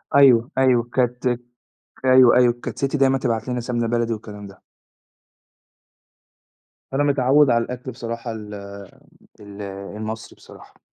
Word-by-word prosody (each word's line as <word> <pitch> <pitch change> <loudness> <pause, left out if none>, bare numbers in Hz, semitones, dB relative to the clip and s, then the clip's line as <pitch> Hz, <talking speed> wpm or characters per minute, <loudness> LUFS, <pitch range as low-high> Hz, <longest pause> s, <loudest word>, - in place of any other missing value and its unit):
أيوه، 130 -4 +5
أيوه 130 -3 +3
كانت 125 +1 -1 0.8
أيوه، 130 -1 +6
أيوه، 125 -1 +5
كانت - - -6
سِتّي 140 +1 -1
دايمًا 135 0 +3
تبعَت 115 -2 -2
لنا 125 0 -2
سَمنة 120 -1 -2
بلدي 115 0 0
والكلام 105 -2 -8
ده. 95 -1 -15 2.3
فأنا 135 +2 +1
متعوّد 140 0 +3
على 115 -1 +2
الأكْل 125 +2 -7
بصراحة 115 0 -6
ال 105 -2 -8 0.9
ال 100 0 -11
المصري 105 +3 -7
بصراحة. - - -17
120 Hz, 125 wpm, -21 LUFS, 110-130 Hz, 2.3 s, أيوه